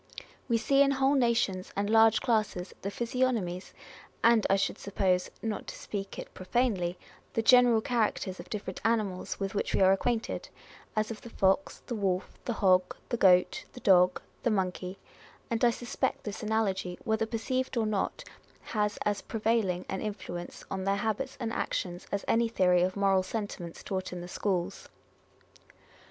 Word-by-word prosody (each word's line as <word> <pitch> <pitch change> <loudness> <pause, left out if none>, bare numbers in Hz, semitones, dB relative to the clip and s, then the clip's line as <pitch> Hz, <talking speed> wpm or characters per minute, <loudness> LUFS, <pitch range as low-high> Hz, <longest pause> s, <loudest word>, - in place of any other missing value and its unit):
We 235 - +4
see 275 +4 +3
in 280 - +6
whole 270 +1 +3
nations 230 -8 +1
and 200 +1 0
large 225 0 +5
classes 215 -6 0
the 200 - -2
physiognomies, 230 -6 -1 0.5
and 230 -2 +5
I 195 - +5
should 195 - -1
suppose 185 -2 0
(" - - -35
not 220 -2 -3
to - - -6
speak 200 -2 -5
it - - -8
profanely 185 -3 0 0.2
") - - -30
the 225 - +1
general 245 -2 +6
characters 215 -7 -1
of 175 +1 -9
different 200 -3 -5
animals 215 -5 0
with 195 -1 -2
which 205 - -1
we - - +2
are 190 0 +7
acquainted, 225 +4 -1 0.5
as 215 +1 0
of 220 - -7
the 235 - -10
fox, 195 +7 +1
the 245 - -4
wolf, 195 -4 -1
the 240 - -1
hog, 185 -4 +3
the 240 - 0
goat, 180 -4 +4
the - - -9
dog, 180 -4 +5 0.2
the 240 - +1
monkey; 185 -2 -1 0.5
and 230 +1 0
I 240 - +7
suspect 240 +1 -2
this 210 -1 -5
analogy, 205 -5 -1
whether 220 -1 0
perceived 255 +3 -2
or 225 - +2
not, 210 -2 -1 0.4
has 210 -1 -1
as 205 -1 0
prevailing 215 -5 0
an 190 - -3
influence 185 -4 -6
on 190 -1 -2
their 195 +1 +1
habits 220 +5 -2
and 230 -2 -3
actions 175 -5 -3
as 200 - -2
any 235 0 +3
theory 180 -5 +3
of 185 +2 0
moral 195 -1 +3
sentiments 185 -4 -5
taught 185 -1 -3
in 180 -1 -5
the 175 - -7
schools. 185 0 -2
205 Hz, 170 wpm, -29 LUFS, 185-230 Hz, 0.5 s, are